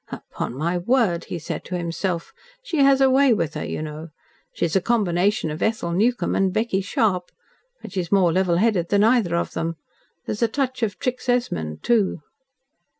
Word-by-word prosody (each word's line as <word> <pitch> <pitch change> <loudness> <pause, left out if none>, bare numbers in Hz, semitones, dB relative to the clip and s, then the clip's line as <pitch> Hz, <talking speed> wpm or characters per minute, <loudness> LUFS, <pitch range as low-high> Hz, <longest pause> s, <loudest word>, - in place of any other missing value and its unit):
"Upon - - -6
my 170 +5 -1
word," 200 -4 +1
he - - -5
said 160 - -5
to 180 - -3
himself. 170 0 -3 0.3
"She 360 -10 -3
has 275 -1 +5
a 265 - +6
way 265 -2 +5
with 165 -6 -2
her, - - -4
you - - -4
know. 155 +1 -7 0.4
She - - -1
is 165 - -2
a 190 - +4
combination 200 -5 +1
of 155 - -6
Ethel 220 -6 0
Newcome 230 +8 +1
and 190 -1 +2
Becky 215 -1 0
Sharp. 195 -4 0 0.5
But - - -8
she 195 - -2
is 175 -2 -4
more 185 -4 +4
level 185 -1 +2
headed 195 -4 +1
than 205 0 +3
either 220 -7 +3
of 170 - -2
them, 165 0 -2 0.5
There's 215 - -4
a 230 - +4
touch 260 +2 -2
of 205 -5 -1
Trix 250 +4 -3
Esmond, 80 - -1
too." 210 -9 +1
190 Hz, 195 wpm, -23 LUFS, 170-235 Hz, 0.5 s, a